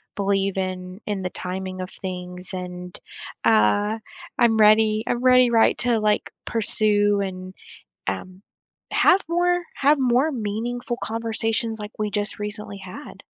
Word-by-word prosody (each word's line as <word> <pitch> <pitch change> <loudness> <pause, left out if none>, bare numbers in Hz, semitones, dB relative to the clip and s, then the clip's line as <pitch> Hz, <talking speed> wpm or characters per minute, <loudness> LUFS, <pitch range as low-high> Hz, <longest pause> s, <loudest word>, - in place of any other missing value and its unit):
believe 195 -1 0
in 185 0 -4
in 200 -3 -2
the 180 - -2
timing 185 0 -5
of 185 - -5
things, 180 0 -6
and, 180 -1 -7 0.5
uh, 205 - +3 0.4
I'm 235 -2 +4
ready 215 0 +5
I'm 240 +1 -1
ready, 255 -1 +6
right, 230 -1 +4
to, 235 -2 +2
like, 210 0 +1 0.2
pursue 205 -2 +2
and, 185 -1 -5 0.6
um, 180 - -5 0.5
have 385 +1 +5
more 355 +1 +2
have 285 +1 +3
more 260 +4 +3
meaningful 240 +2 -3
conversations 225 0 -1
like 210 0 -6
we 210 -1 0
just 205 +1 -2
recently 210 -1 -5
had. 190 +9 -10
210 Hz, 135 wpm, -23 LUFS, 185-230 Hz, 0.6 s, ready